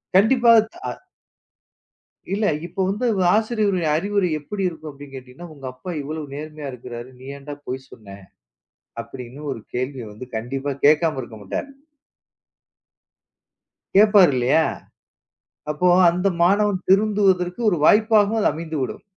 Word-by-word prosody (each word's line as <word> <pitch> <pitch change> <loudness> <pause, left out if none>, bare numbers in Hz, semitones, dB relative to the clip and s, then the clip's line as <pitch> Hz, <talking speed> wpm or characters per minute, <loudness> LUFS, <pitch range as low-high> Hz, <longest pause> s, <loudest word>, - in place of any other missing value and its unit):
கண்டிப்பா 235 +4 +5 0.2
தா 355 - -15 1.5
இல்லை, 205 +1 +1 0.2
இப்போ 185 +3 -4
வந்து 210 +6 -2 0.3
ஆசிரியரின் 210 -6 +1
அறிவுரை 200 +2 0
எப்படி 195 +7 -5
இருக்கும் 160 -3 -7
அப்படி 140 0 -12
என்று 135 -1 -13
கேட்டீங்க 125 -1 -11
என்றால், 175 -1 -10
உங்க 135 -2 -11
அப்பா 180 +8 -8
இவ்வளவு 150 0 -6
நேர்மையாக 150 -2 -7
இருக்கிறார், 120 0 -9
நீ 130 - -13
ஏன்டா 145 +1 -8
பொய் 130 +1 -5
சொன்ன? 100 -3 -12 0.9
அப்படி 125 -2 -9
என்று 145 +5 -11
ஒரு 115 - -10
கேள்வியை 125 -2 -3
வந்து 125 +4 -10
கண்டிப்பாக 135 +4 -4
கேட்காமல் 155 -3 +3
இருக்க 110 -2 -11
மாட்டாரு. 275 - -4 2.3
கேட்பார் 205 -5 +6
இல்லையா? 130 +6 +3 1.1
அப்போ 180 +4 0 0.2
அந்த 180 +3 0
மாணவன் 195 +1 +2
திருந்துவதற்கு 195 -2 +2
ஒரு 175 - 0
வாய்ப்பாகவும் 215 0 +4
அது - - +3
அமைந்துவிடும். 155 -4 -4
160 Hz, 130 wpm, -22 LUFS, 135-200 Hz, 2.3 s, கேட்பார்